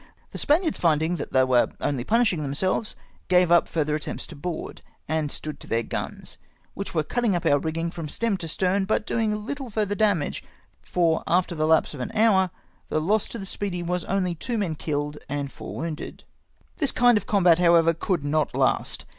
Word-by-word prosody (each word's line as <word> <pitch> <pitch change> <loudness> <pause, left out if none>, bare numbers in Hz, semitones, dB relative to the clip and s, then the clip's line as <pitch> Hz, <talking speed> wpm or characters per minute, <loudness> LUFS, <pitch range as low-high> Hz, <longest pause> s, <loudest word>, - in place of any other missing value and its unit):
The - - -5
Spaniards 320 +2 +2
finding 160 +1 +2
that - - -6
they 130 - +4
were 125 -2 +3
only 135 -4 -1
punishing 215 - +2
themselves, 170 +9 -1 0.3
gave 180 -1 +4
up 175 - +5
finther 155 -2 0
attempts 150 -1 -3
to - - -10
board, 160 +3 -5 0.3
and 155 -2 -1
stood 150 -2 -5
to - - -9
their 115 +1 0
guns, - - -5 0.3
which 200 -3 -6
were 155 - +2
cutting 235 +3 0
up 175 - -2
our 145 - +4
rigging 165 +2 -2
from 165 -3 -6
stem 230 +5 0
to 170 - -6
stern, 190 +4 +1
but 215 +1 0
doing 215 -2 -1
little 275 -1 -5
farther 210 -2 0
damage; 205 -8 +1 0.4
for 165 -3 +1
after 175 0 +2
the 155 -1 0
lapse 160 0 +3
of 145 - -8
an 125 - -4
hour 205 -4 +4 0.4
the 155 - +1
loss 200 +7 +1
to - - -6
the 195 - -6
Speedy 190 -2 -4
was 180 0 -1
only 185 -2 0
two 230 +8 -3
men 185 -7 -1
kiUed 150 -1 -3
and 140 0 -3
four - - -8
wounded. 160 -2 -5 0.5
This 285 -5 +2
kind 245 -1 +5
of 210 - -1
combat, 180 -5 +4
however, 170 -1 +5
could 165 -1 -1
not 150 +1 0
last. - - +1
175 Hz, 195 wpm, -25 LUFS, 155-205 Hz, 0.5 s, up